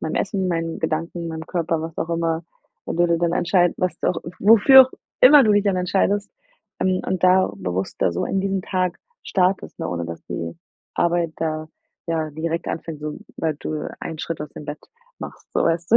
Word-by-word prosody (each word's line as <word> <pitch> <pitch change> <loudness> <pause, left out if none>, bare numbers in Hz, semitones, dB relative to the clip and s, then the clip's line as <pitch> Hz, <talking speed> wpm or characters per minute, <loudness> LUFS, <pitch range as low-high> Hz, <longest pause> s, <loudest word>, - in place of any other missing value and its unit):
meinem 160 - -3
Essen, 190 -1 -1
meinen 165 -1 -2
Gedanken, 165 +2 -2
meinem 160 0 -6
Körper“, 165 -2 -1
was 165 0 -6
auch 165 - -2
immer. 165 0 -1 0.4
Wo - - -4
du 175 +1 +3
dir 170 0 +1
dann 170 0 +1
entscheiden, 175 0 +2
was 180 -1 -1 0.4
wofür 230 +6 +8
auch 260 - -3 0.3
immer 280 +2 +9
du 210 - +4
dich 205 -1 +4
dann 195 -2 +2
entscheidest, 195 +3 +1 0.5
ähm, 185 0 +1
und 185 -2 -2
da 185 +1 +5
bewusster 95 -1 -2
so 85 - -1
in 195 - 0
diesen 195 0 -1
Tag 185 -2 -1 0.2
startest, 190 0 0
ne, - - -3
ohne 85 -1 -3
dass 85 0 -7
die 85 0 -5 0.4
Arbeit 170 -1 +1
da, 155 -1 -3 0.4
ja, 160 -2 -1
direkt 165 +3 -3
anfängt, 160 -2 -5
sobald 150 0 -5
du 155 -1 -3
einen 160 - -6
Schritt 165 -1 -4
aus 150 - -6
dem - - -10
Bett 150 +1 -6 0.4
machst. - - -9
So, - - +1
weißt 165 +3 0
du, - - +10
170 Hz, 190 wpm, -22 LUFS, 160-185 Hz, 0.5 s, du